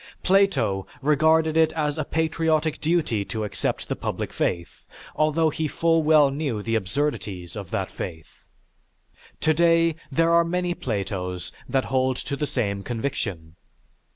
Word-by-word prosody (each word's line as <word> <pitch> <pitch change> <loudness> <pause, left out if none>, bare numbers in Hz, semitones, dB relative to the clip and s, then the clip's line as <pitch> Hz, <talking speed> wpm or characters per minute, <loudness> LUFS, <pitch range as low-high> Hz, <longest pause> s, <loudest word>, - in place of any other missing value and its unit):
Plato 135 - +2 0.2
regarded 155 +2 +3
it 160 -1 +4
as 150 -2 -1
a 155 - -1
patriotic 160 0 0
duty 155 -10 +1
to 110 0 -4
accept 105 - -2
the - - -2
public - - -4
faith 85 -1 -2 0.3
although 155 +1 +2
he 155 +1 -2
full 165 +2 +2
well 150 -2 +5
knew 135 -7 -2
the 115 - -2
absurdities 100 - -2
of 100 -5 -6
that - - -2
faith. 80 -1 -8 1.0
Today, 165 +1 +3 0.2
there 165 +5 +3
are 170 0 +6
many 175 +1 -1
Platos 95 - -4 0.2
that 135 -1 +1
hold 130 -1 +1
to 140 - -4
the 150 +1 -2
same 100 -7 -1
conviction. 100 -9 -4
145 Hz, 140 wpm, -24 LUFS, 105-160 Hz, 1.0 s, are